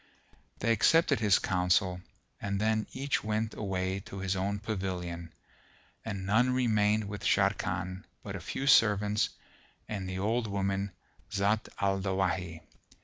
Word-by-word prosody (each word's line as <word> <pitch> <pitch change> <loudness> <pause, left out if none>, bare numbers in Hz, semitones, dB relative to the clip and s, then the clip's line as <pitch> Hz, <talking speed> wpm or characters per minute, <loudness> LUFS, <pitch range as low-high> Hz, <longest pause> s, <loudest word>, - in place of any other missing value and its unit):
They 115 - +1
accepted 145 +4 +4
his 105 -4 +4
counsel 90 0 +1 0.4
and 100 0 -1
then 110 0 +1
each 140 +2 -1
went 110 +1 -1
away 95 -1 -2
to 100 - -8
his 95 0 -1
own 100 +2 -1
pavilion, 90 -5 -4 0.7
and 100 -4 -4
none 115 +6 +3
remained 110 -4 +2
with 105 -1 -6
Sharrkan 95 +1 0 0.2
but - - -6
a - - -4
few 135 - -4
servants 105 -5 +4 0.6
and 95 -3 -4
the 95 - -4
old 110 +4 0
woman 100 0 -1 0.4
Zat 105 +2 +1
al 95 -1 +1
Dawahi. 90 -4 -1
100 Hz, 135 wpm, -30 LUFS, 95-110 Hz, 0.7 s, accepted